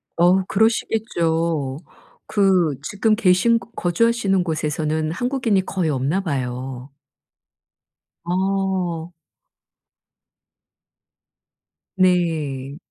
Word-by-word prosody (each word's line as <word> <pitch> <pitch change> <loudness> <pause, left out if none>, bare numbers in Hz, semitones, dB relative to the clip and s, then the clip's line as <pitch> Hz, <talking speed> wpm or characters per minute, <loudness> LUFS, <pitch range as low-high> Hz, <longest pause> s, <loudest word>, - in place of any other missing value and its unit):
어우 180 +2 +4
그러시겠죠. 170 -10 0 0.5
그 185 -7 +2
지금 215 +4 +1
계신 220 +2 +3
거 - - -15
거주하시는 195 +1 +1
곳에서는 155 -1 -1
한국인이 235 -3 0
거의 180 -5 -1
없나 145 +7 0
봐요. 130 -4 -4 1.3
어. 185 -2 -1 2.8
네. 160 -7 0
175 Hz, 160 characters per minute, -21 LUFS, 155-195 Hz, 2.8 s, 어우